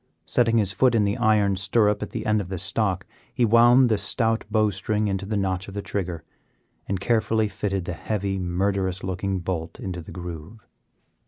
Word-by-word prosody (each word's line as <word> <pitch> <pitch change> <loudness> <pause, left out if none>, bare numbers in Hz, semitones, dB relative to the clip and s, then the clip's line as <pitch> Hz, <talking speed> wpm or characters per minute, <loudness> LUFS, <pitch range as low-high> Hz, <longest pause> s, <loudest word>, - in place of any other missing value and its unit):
Setting 115 -1 +2
his 100 -4 +2
foot 120 +5 +3
in 110 - +3
the 100 +1 0
iron 110 -4 +3
stirrup 105 +2 +2
at - - -4
the - - -5
end 105 0 +2
of 90 - -8
the 95 - -3
stock, 95 +1 -1 0.3
he 120 - +2
wound 120 +3 +6
the 110 -3 +1
stout 115 +3 0
bow 110 -1 +2
string 105 +3 -1
into 100 0 -2
the 105 0 -1
notch 95 -2 -1
of 100 - -9
the 100 - -3
trigger, 90 -5 -4 0.6
and 95 -1 -1
carefully 110 0 +1
fitted 100 -2 -3
the 90 - -3
heavy, 95 +4 -2
murderous 95 +1 -1
looking 95 +1 -2
bolt 85 -2 -4
into 90 -2 -5
the 80 - -11
groove. 90 +4 -8
100 Hz, 190 wpm, -24 LUFS, 95-110 Hz, 0.6 s, wound